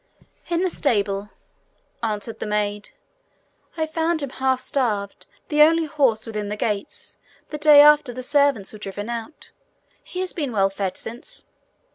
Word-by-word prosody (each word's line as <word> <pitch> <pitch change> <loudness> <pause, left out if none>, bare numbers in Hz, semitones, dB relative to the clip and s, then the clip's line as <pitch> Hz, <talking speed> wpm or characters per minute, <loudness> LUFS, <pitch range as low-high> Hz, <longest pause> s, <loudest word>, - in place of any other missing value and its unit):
'In 340 +1 +1
the 370 - 0
stable,' 205 -8 0 0.7
answered 220 0 -3
the - - -4
maid. 210 0 -2 0.9
'I 320 - +1
found 320 0 -1
him 275 - -4
half 260 -1 0
starved, 215 -8 -2 0.2
the 300 0 +3
only 325 +2 +5
horse 270 -8 +1
within 210 -2 -4
the 210 - -3
gates, 210 -1 -4 0.3
the 300 - -5
day 300 -1 +8
after 295 -3 +6
the 255 +1 -7
servants 280 -8 +1
were 215 - -10
driven 205 +3 -6
out. 235 +6 -7 0.5
He 365 - -5
has 370 - 0
been 290 -6 -3
well 195 -3 +2
fed 195 -1 -3
since.' 245 - -7
245 Hz, 155 wpm, -23 LUFS, 210-300 Hz, 0.9 s, day